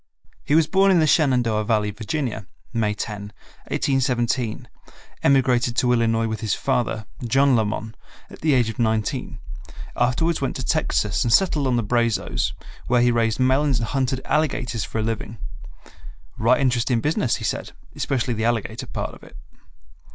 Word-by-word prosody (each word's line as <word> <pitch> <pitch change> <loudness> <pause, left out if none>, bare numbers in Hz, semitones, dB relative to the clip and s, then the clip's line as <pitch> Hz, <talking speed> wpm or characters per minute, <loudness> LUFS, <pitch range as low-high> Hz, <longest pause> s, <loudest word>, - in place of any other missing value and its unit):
He 145 - +1
was 160 0 +5
born 195 +4 +3
in 185 -3 +5
the 160 - +4
Shenandoah 125 -8 +2
Valley, 105 -1 +1
Virginia, 110 0 -4 0.3
May 105 -3 0
10, 105 -1 -5 0.4
1817, 125 -3 0 0.5
emigrated 130 -3 +3
to 125 -1 +3
Illinois 115 -1 +2
with 110 0 -3
his 110 -3 0
father, 120 -5 -1 0.2
John 135 +3 +3
Lamon, 110 0 -2 0.3
at - - -14
the 155 -2 +2
age 120 -3 +3
of 115 +3 -6
nineteen; 110 -2 -1 0.6
afterwards 130 +7 +1
went 135 - -2
to 130 - -4
Texas 105 - 0
and 120 - 0
settled 150 - +3
on 125 - +1
the 120 - +1
Brazos, 115 +1 0 0.3
where 120 0 +3
he 120 - +4
raised 115 -1 +1
melons 130 +1 +3
and 115 -2 -3
hunted 130 -1 -1
alligators 135 -7 0
for - - -6
a 110 - 0
living. 110 0 -4 1.0
"Right 120 +3 +3
interestin' 125 -2 +1
business," 145 -4 +1
he - - -7
said; 105 - -3 0.2
"especially 130 -3 -1
the 110 0 -2
alligator 115 -2 -2
part - - -4
of - - -14
it." - - -15
120 Hz, 160 wpm, -23 LUFS, 110-135 Hz, 1.0 s, was